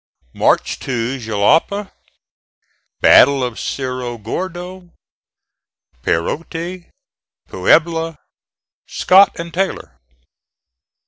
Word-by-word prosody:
MARCH - - +1
TO 125 +1 -3
JALAPA 145 - +1 1.1
BATTLE 140 0 +6
OF 120 -2 -4
CERRO 125 -3 -4
GORDO 180 - -6 1.1
PEROTE 165 - -3 0.6
PUEBLA 165 -1 +1 0.7
SCOTT 195 0 +4
AND 170 0 -7
TAYLOR. 190 +2 -3
165 Hz, 65 wpm, -18 LUFS, 125-180 Hz, 1.1 s, BATTLE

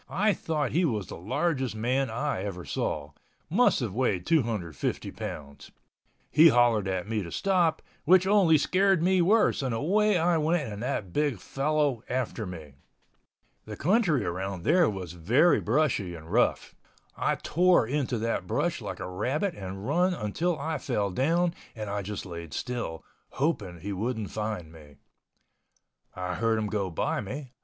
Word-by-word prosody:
I 205 +4 +2
thought 155 -5 -2
he 175 +4 +2
was 110 - 0
the - - -8
largest 130 - -1
man 125 +4 0
I 125 -1 -2
ever 95 -3 -5
saw—must 105 - -1
have 110 -6 -3
weighed 105 -7 0
250 110 - -1
pounds. 70 -1 -8 0.6
He 155 +4 +7
hollered 120 -6 +3
at 95 0 -2
me 110 -1 -1
to 85 -3 -7
stop, 180 -5 +1 0.2
which 185 +3 +5
only 190 -5 +5
scared 190 +3 +2
me 185 0 +3
worse 210 +1 +3
and 130 -4 -1
away 205 - +2
I 170 0 +2
went 160 +1 +1
and 105 - -7
that 110 -8 -3
big 145 -6 +1
fellow 140 +2 0
after 120 -4 -2
me. 80 -6 -9 0.9
The 105 -1 -7
country 175 - +2
around 95 +1 -4
there 175 - +4
was 95 -4 -6
very 120 - +3
brushy 115 - 0
and 80 0 -11
rough. - - +1 0.4
I - - 0
tore 180 -4 +3
into 130 -1 -1
that 115 +1 -2
brush - - -1
like - - -6
a - - -4
rabbit 130 - -1
and 95 - -7
run 180 +5 +2
until 160 - -1
I 155 +1 -3
fell 100 -5 -1
down 170 - +1 0.2
and 105 -2 -5
I 100 0 -2
just 100 +1 -5
laid 85 -3 -7
still, 120 -10 -4 0.3
hoping 105 - -2
he 100 +3 -4
wouldn't 110 0 -3
find 105 -7 -4
me. 75 -3 -15 1.2
I 90 0 -3
heard 115 +3 +1
him 105 -1 -1
go 100 -3 -1
by 80 - -1
me. 130 +5 -7
120 Hz, 160 wpm, -28 LUFS, 95-160 Hz, 1.2 s, He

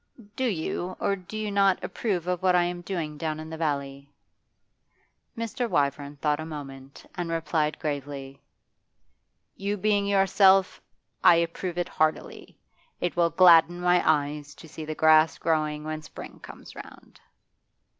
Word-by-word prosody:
'Do 260 - -1
you, 180 -3 -3
or 200 - 0
do 190 +3 -9
you 215 -1 -3
not, 195 -1 +2
approve 190 -7 -2
of 180 -1 -2
what 185 -1 +3
I 175 - +4
am 175 0 -3
doing 165 -5 -5
down 155 -1 -3
in 155 0 -8
the - - -5
valley?' 140 -3 -3 1.3
Mr. 230 +2 -3
Wyvern 140 -1 -1
thought 150 +1 -1
a - - -4
moment, 135 -3 -9
and 175 -1 -4
replied 160 -2 -1
gravely: 140 -2 -5 1.1
'You 200 +1 -3
being 205 0 +1
yourself, 195 -1 +4 0.4
I - - +8
approve 170 +1 -2
it 175 - -1
heartily. 155 0 -2 0.4
It 175 - -2
will 170 -1 +3
gladden 175 -1 +6
my 180 0 +3
eyes 145 -1 0
to 160 - -13
see 155 0 -8
the 155 0 -5
grass 155 0 +4
growing 155 -2 -1
when 155 0 -5
spring 155 - -11
comes - - -12
round. - - -13
165 Hz, 150 wpm, -26 LUFS, 150-185 Hz, 1.3 s, I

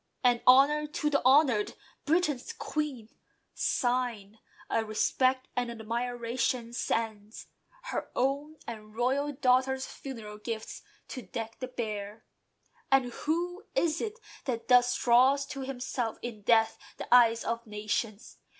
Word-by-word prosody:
And, 245 -1 +4
honour 285 +4 +6
to 300 0 -1
the 280 - +2
honour'd! 260 -5 +4 0.3
Britain's 305 - +1
Queen 300 - -4 0.4
Sign 240 -4 -1 0.3
of 225 -1 0
"respect 255 +4 +1
and 245 -1 -1
admiration" 235 +1 -2
sends, 220 -2 -3 0.4
Her - - -4
own, 280 +4 0
and 215 -2 -9
royal 270 +5 +1
daughter's 265 -1 +2
funeral 220 -6 -8
gifts 220 0 -5 0.3
To 255 - -6
deck 225 +2 -6
the 255 - -4
bier. 215 -3 -5 0.7
And 255 -3 +3
who 350 +4 -2
is 335 -8 +1
it 440 0 -4 0.3
that 235 -3 -3
thus 250 0 +5
Draws 260 +3 +4
to 275 - -6
himself, 250 -3 -3
in 230 -3 -6
death, 225 +1 +3 0.2
the - - -2
eyes 230 -2 +6
of 230 0 -3
nations? 210 0 -3
245 Hz, 125 wpm, -29 LUFS, 225-275 Hz, 0.7 s, honour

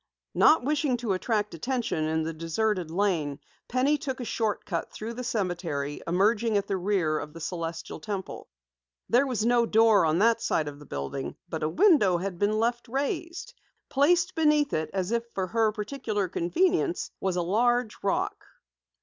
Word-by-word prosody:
Not 315 - +5
wishing 290 -2 +1
to 230 -4 -1
attract 210 +2 -1
attention 235 - -2
in 160 0 0
the 165 +1 -3
deserted 170 +3 -1
lane, 165 -6 0 0.3
Penny 270 +4 +2
took 265 -3 -4
a 245 - -4
short 220 -2 -1
cut 170 -4 -3
through 225 +2 -6
the 250 +2 -6
cemetery, 175 - -2
emerging 210 +5 +2
at 200 - 0
the 195 - -1
rear 180 -5 0
of 150 - -7
the 165 - -9
Celestial 165 -1 -5
Temple. 190 +3 -6 0.6
There 250 +4 +4
was 230 -4 -1
no 240 -1 +3
door 220 -6 +5
on 155 +1 +2
that 230 +3 +3
side 155 - 0
of 145 0 -7
the 150 - -14
building 70 - -4
but 160 -2 -4
a 155 - 0
window 290 - +4
had 180 0 -4
been 210 +1 +1
left 240 +2 0
raised. 335 - -3 0.4
Placed 345 +6 +3
beneath 300 -3 +2
it, 155 0 -1
as 190 +1 -2
if 235 0 +1
for 190 - 0
her 220 +2 +1
particular 210 -2 -3
convenience, 350 - 0
was 190 -2 -1
a 175 - 0
large 240 +5 +1
rock. 200 - -1
210 Hz, 175 wpm, -27 LUFS, 170-245 Hz, 0.6 s, Not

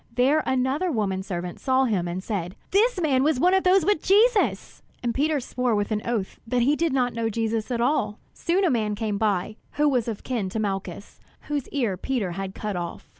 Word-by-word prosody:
There 275 +5 +3
another 265 +7 +1
woman 200 -6 -1
servant 175 -2 -5
saw 260 0 +2
him 195 -7 0
and 180 +2 -4
said: 185 -4 -3 0.2
"This 420 +2 +3
man 280 -6 +2
was 290 -1 +2
one 360 +6 +4
of 380 - +3
those 370 -2 +4
with 410 -6 +2
Jesus!" 430 +3 +2 0.2
And 235 -1 0
Peter 295 +3 +1
swore 250 -2 -1
with 205 +1 -1
an 210 -1 0
oath 225 -5 -2
that 245 +1 +1
he 285 +4 +3
did 330 0 0
not 250 -2 +1
know 230 0 -1
Jesus 225 0 -2
at 240 -2 -1
all. 235 -5 +1 0.2
Soon 370 +3 +1
a 340 - +3
man 215 -4 0
came 210 -2 -2
by, 215 0 0 0.2
who 295 +1 +2
was 250 -5 +1
of 220 -3 -4
kin 230 -7 -2
to 220 - -3
Malchus, 195 -2 -4 0.2
whose 290 -3 -3
ear 235 -10 -1
Peter 225 -4 -2
had 190 +2 -5
cut 210 -2 -4
off. 175 -1 -6
235 Hz, 215 wpm, -25 LUFS, 205-290 Hz, 0.2 s, one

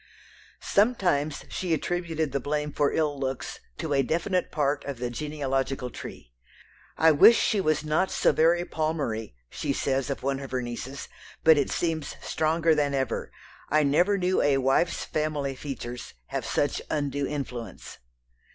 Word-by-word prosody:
Sometimes 180 - +1
she 175 -3 -1
attributed 165 -3 -2
the 140 - 0
blame 150 +2 -2
for 145 -1 +2
ill 150 -3 0
looks 135 -1 -3 0.2
to 160 -3 -2
a 135 - +4
definite 170 +6 0
part 145 -2 0
of 140 -2 -4
the 120 0 -3
genealogical 135 -2 -2
tree. - - -10 0.6
"I 160 0 +6
wish 190 +10 +8
she 205 - +2
was 155 -3 +1
not 155 +5 +1
so - - +3
very 170 +2 +3
Palmery," 145 - -2
she 140 - -3
says 135 0 0
of 140 - -4
one 135 0 0
of 135 -1 -7
her 130 0 -1
nieces, 125 +4 -6 0.4
"but 160 0 +8
it 140 - 0
seems 160 -4 -2
stronger 160 +1 +1
than 145 -2 +1
ever, 135 -1 -2 0.4
I 155 +1 +4
never 175 +8 +3
knew 185 0 +1
a 145 -1 +3
wife's 135 +6 +1
family 150 -3 -2
features 125 -3 -7
have - - -3
such - - 0
undue 145 -1 -1
influence." 125 -6 -6
145 Hz, 155 wpm, -27 LUFS, 135-160 Hz, 0.6 s, wish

